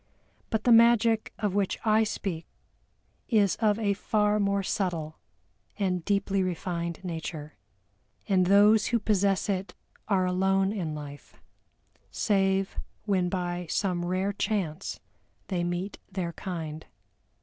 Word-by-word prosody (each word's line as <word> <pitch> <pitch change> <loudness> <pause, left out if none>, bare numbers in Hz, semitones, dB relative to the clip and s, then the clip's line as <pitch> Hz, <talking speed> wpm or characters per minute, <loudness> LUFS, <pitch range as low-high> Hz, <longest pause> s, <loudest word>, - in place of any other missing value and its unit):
But 220 -1 -1
the 245 - +4
magic 230 -1 +5
of 210 -4 -1
which 200 -1 0
I 220 0 +4
speak 185 -6 -4 0.8
is 210 -6 +3
of 215 -2 +2
a 205 -3 +1
far 210 +1 +1
more 200 -1 +1
subtle 170 -6 -2 0.6
and 185 -4 0
deeply 200 0 +1
refined 170 -2 -3
nature, 160 -3 -5 0.7
and 185 -3 +3
those 205 +2 +5
who 235 - +2
possess 200 -3 +1
it 195 -1 -2 0.3
are 190 -3 +2
alone 190 +2 +2
in 165 -7 -3
life, 145 -1 -9 0.7
save 195 -2 +1 0.3
when 185 -4 +1
by 175 -1 -3
some 180 -2 0
rare 185 +3 -1
chance 195 -5 -2 0.5
they 180 -3 -1
meet 175 +3 -3
their 180 -3 -3
kind. 160 -4 -6
195 Hz, 125 wpm, -28 LUFS, 175-205 Hz, 0.8 s, magic